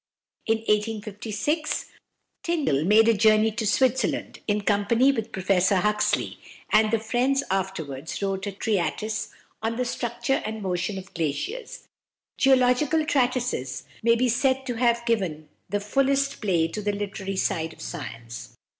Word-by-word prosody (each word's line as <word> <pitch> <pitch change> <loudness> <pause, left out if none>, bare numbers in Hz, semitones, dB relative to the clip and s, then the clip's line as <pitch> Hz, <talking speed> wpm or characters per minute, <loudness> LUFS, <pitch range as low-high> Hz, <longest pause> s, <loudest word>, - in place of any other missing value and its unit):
In 225 0 +3
1856 215 - -1 0.5
Tyndall 285 - 0
made 215 +4 +6
a 230 - +6
journey 215 +1 +4
to 220 0 -2
Switzerland, 260 0 +1
in 210 -1 +1
company 210 +6 +3
with 225 -4 -4
Professor 190 0 +2
Huxley, 210 +3 +1 0.3
and 215 0 +5
the 230 - +2
friends 245 +5 +1
afterwards 160 -7 -3
wrote 195 0 -2
a - - -2
treatise 215 +2 -1 0.3
"On 225 +1 -1
the 250 +1 -1
Structure 240 +2 -1
and 215 -1 -5
Motion 180 +1 -2
of 190 0 -9
Glaciers." 420 - -4 0.5
Geological 265 +4 +3
treatises 250 - 0 0.2
may 230 +1 +4
be 250 +2 +2
said 260 +2 +1
to 250 - -2
have 235 0 +1
given 185 -10 -1 0.2
the 205 - 0
fullest 275 +6 +1
play 175 -6 +2
to 210 +6 -5
the 205 0 -1
literary 195 -1 -4
side 165 -3 0
of - - -16
science. 115 -7 -7
215 Hz, 140 wpm, -25 LUFS, 195-250 Hz, 0.5 s, made